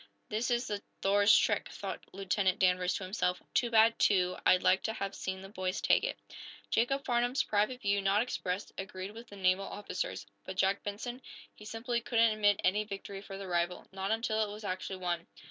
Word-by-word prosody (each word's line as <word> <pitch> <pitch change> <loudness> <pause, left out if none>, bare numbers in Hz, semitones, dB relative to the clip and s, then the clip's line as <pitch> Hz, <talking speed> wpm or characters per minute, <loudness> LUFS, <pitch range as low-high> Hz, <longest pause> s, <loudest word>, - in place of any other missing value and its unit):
"This 220 +4 -1
is 240 0 +1
the 205 -3 -3 0.2
'Thor's' 205 +1 +6
trick," - - +1
thought - - -6
Lieutenant 195 0 0
Danvers 180 -1 +2
to - - -4
himself. 185 -1 -1
"Too 240 - +2
bad, 225 0 +5
too. 180 -2 +3
I'd 185 - +5
like 190 - +4
to 220 - -2
have 195 -2 -4
seen 190 0 -4
the 195 - -9
boys 185 -2 -2
take - - +3
it." - - -2 0.5
Jacob 275 +5 +1
Farnum's 245 +1 +2
private 215 +5 0
view, 200 0 +2
not 195 +3 +3
expressed, 190 -6 -3
agreed 190 0 -5
with 230 +2 -11
the 205 - -11
naval 190 0 +2
officer's. 180 - -4 0.2
But 190 - -7
Jack 195 +1 +2
Benson? 240 +5 -5 0.3
He 210 - -14
simply 235 +2 -2
couldn't 230 -1 +3
admit 205 -2 +3
any 205 +3 +3
victory 195 -1 -7
for 195 -1 -8
the 195 - -6
rival 175 0 -1
not 190 0 -3
until 220 0 +1
it 210 - -4
was 210 +1 -9
actually 185 0 -3
won. 175 -2 -2
200 Hz, 195 wpm, -32 LUFS, 185-220 Hz, 0.5 s, Thor's